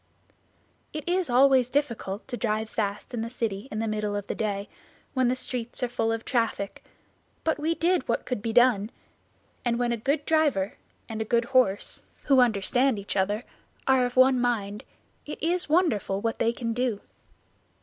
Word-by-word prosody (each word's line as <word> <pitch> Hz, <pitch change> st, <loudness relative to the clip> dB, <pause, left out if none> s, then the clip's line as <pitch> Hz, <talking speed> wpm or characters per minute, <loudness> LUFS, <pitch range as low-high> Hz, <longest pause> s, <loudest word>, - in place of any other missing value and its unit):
It 305 Hz, 0 st, -6 dB
is 360 Hz, -2 st, +1 dB
always 255 Hz, 0 st, +5 dB
difficult 235 Hz, -8 st, -2 dB
to 255 Hz, -, -4 dB
drive 220 Hz, -1 st, -1 dB
fast 205 Hz, +2 st, -3 dB
in 235 Hz, -, -2 dB
the 230 Hz, -, -3 dB
city 225 Hz, -2 st, -3 dB
in 215 Hz, -, -5 dB
the 225 Hz, +1 st, -1 dB
middle 210 Hz, -1 st, -1 dB
of 205 Hz, -1 st, -3 dB
the -, -, -3 dB
day, 205 Hz, -2 st, -2 dB, 0.5 s
when 260 Hz, -2 st, +2 dB
the 250 Hz, -, +2 dB
streets 250 Hz, -1 st, -4 dB
are -, -, +2 dB
full 230 Hz, -2 st, -1 dB
of 225 Hz, 0 st, -3 dB
traffic, 230 Hz, -5 st, -1 dB, 0.6 s
but 320 Hz, -2 st, 0 dB
we 320 Hz, +3 st, 0 dB
did 345 Hz, -3 st, +1 dB
what 235 Hz, -, -1 dB
could 250 Hz, -5 st, -3 dB
be 225 Hz, -, -2 dB
done; 235 Hz, -3 st, +4 dB, 0.7 s
and 235 Hz, -1 st, +1 dB
when 240 Hz, 0 st, 0 dB
a 235 Hz, -, 0 dB
good 280 Hz, +6 st, -1 dB
driver 290 Hz, -12 st, +2 dB, 0.3 s
and 225 Hz, -1 st, -4 dB
a -, -, +2 dB
good 235 Hz, +2 st, +1 dB
horse, 240 Hz, -6 st, +1 dB, 0.2 s
who 270 Hz, -2 st, +4 dB
understand 245 Hz, +2 st, +3 dB
each 200 Hz, 0 st, -5 dB
other, 205 Hz, +4 st, 0 dB, 0.4 s
are 265 Hz, -1 st, +4 dB
of 245 Hz, 0 st, -2 dB
one 260 Hz, 0 st, +6 dB
mind, 210 Hz, -4 st, -1 dB, 0.4 s
it 300 Hz, -, -5 dB
is 345 Hz, 0 st, -1 dB
wonderful 290 Hz, -, +2 dB
what 225 Hz, +2 st, -2 dB
they 230 Hz, -, +3 dB
can 235 Hz, -1 st, -3 dB
do. 245 Hz, -3 st, -1 dB
240 Hz, 180 wpm, -27 LUFS, 215-260 Hz, 0.7 s, one